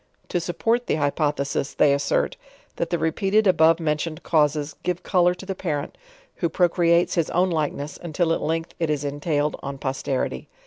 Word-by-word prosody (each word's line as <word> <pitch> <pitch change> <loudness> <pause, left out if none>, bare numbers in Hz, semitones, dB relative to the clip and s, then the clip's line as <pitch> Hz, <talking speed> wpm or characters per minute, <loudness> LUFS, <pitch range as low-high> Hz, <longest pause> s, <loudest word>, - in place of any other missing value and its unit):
To 175 - 0
support 230 +8 0
the - - +1
hypothesis 145 -2 -1
they 145 -2 +4
assert, 140 0 0 0.4
that 170 - -1
the 175 - 0
repeated 195 +7 +1
above 165 -3 +5
mentioned 155 +1 -2
causes 150 -2 +1
give 180 0 -2
color 180 -1 +3
to 190 - -10
the 195 - -3
parent, 155 -6 -3 0.4
who 170 - 0
procreates 170 0 +3
his 170 -3 +1
own 180 +2 +2
likeness, 150 -2 -2
until 165 0 0
at - - -2
length 165 +1 -2
it 165 -2 0
is 150 -2 0
entailed 145 +1 -1
on 140 0 -5
posterity. 135 -1 -2
160 Hz, 170 wpm, -24 LUFS, 150-175 Hz, 0.4 s, above